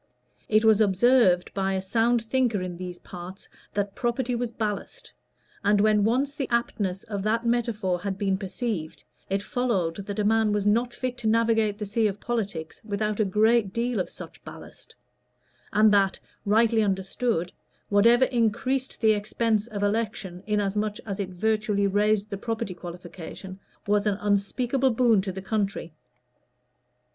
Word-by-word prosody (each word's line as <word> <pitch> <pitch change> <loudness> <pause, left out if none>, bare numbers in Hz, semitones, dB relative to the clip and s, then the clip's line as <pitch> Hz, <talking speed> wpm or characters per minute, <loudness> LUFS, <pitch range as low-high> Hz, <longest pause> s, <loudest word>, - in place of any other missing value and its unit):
It 215 +1 +4
was 220 -1 +5
observed 200 -2 +4
by 195 -1 0
a 190 - -1
sound 230 +4 +2
thinker 240 -3 +1
in 180 -1 -4
these 180 0 -7
parts 180 +2 -10 0.3
that 200 -1 -1
property 245 +1 -1
was 240 0 -1
ballast; 215 -3 -5 0.5
and 205 +1 +3
when 210 0 +4
once 260 +6 +1
the 280 -3 -4
aptness 205 -5 -1
of 205 -3 -4
that 225 +3 0
metaphor 225 -6 0
had 195 -1 -3
been 195 -1 +1
perceived, 190 -3 -4 0.3
it 195 +1 -1
followed 200 -10 -1
that 205 - -4
a 210 - +1
man 220 0 +3
was 205 -1 0
not 235 +4 +2
fit 255 0 -4
to 225 - -2
navigate 225 -2 +2
the 210 - -4
sea 215 +2 +1
of 200 0 -4
politics 200 -10 -4
without 210 0 -2
a 215 - +3
great 215 +1 +3
deal 235 -1 -1
of 185 - -2
such - - -11
ballast; - - -12 0.8
and 215 0 +5
that, 195 -1 +3 0.3
rightly 225 +2 +4
understood, 190 -1 -1 0.4
whatever 235 +5 +5
increased 255 +3 -1
the 220 -1 +5
expense 215 +1 0
of 205 -3 -4
election, 205 -4 -2
inasmuch 210 0 0
as 200 -1 -5
it 195 -2 -2
virtually 210 +2 0
raised 210 +1 +1
the 200 - -3
property 225 -1 -3
qualification, 175 +2 -9 0.3
was 205 +1 +2
an 200 -2 +1
unspeakable 235 +6 +1
boon 230 -4 +3
to 190 0 -4
the 190 +1 -7
country. 200 -5 -2
210 Hz, 155 wpm, -26 LUFS, 195-230 Hz, 0.8 s, was